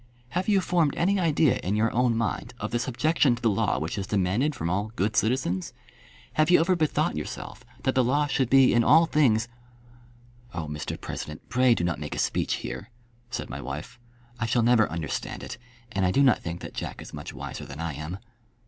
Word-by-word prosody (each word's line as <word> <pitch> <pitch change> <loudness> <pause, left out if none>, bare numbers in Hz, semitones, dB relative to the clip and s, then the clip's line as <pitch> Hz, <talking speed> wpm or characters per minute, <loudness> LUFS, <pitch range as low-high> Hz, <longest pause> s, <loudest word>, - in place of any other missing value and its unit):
"Have 180 +7 -1
you 200 -2 +4
formed 170 -5 +1
any 195 +3 +2
idea 155 -4 +3
in 100 +3 -2
your 110 +1 +2
own 120 -1 +2
mind 115 +2 -2
of 105 - -4
the 120 - 0
subjection 130 +2 +2
to - - -11
the 115 - +4
law 95 - +1
which 80 +8 -3
is 95 - -4
demanded 105 +10 +1
from 85 - -3
all 100 +5 -1
good 105 0 0
citizens? 110 -6 0 0.6
Have 155 +1 +2
you 180 - +7
ever 180 +3 +3
bethought 155 -3 +1
yourself - - -6 0.2
that 130 - +2
the 130 - +3
law 145 +5 +2
should 135 -3 0
be 135 -1 +6
in 120 - +4
all 160 +7 +6
things 125 -8 +2 0.5
" 120 0 -27
"Oh, 85 - -3
Mr 75 0 -5
President, 75 0 -7
pray 125 -1 +4
do 85 - -2
not 85 -3 -1
make 75 -1 -5
a - - -6
speech - - 0
here," 100 - -6 0.4
said 125 - -4
my - - -5
wife. 75 - -7 0.4
"I 115 - -1
shall 115 +1 +2
never 115 -2 +4
understand 80 -2 -4
it, 120 - -7 0.3
and 95 - -1
I 90 - +3
do 140 +9 +3
not 130 - +5
think 85 +1 -5
that - - -8
Jack - - -5
is - - -10
much 75 -1 -7
wiser - - -7
than 70 +3 -9
I 85 -2 -3
am." 75 +6 -5
120 Hz, 215 wpm, -26 LUFS, 95-135 Hz, 0.6 s, you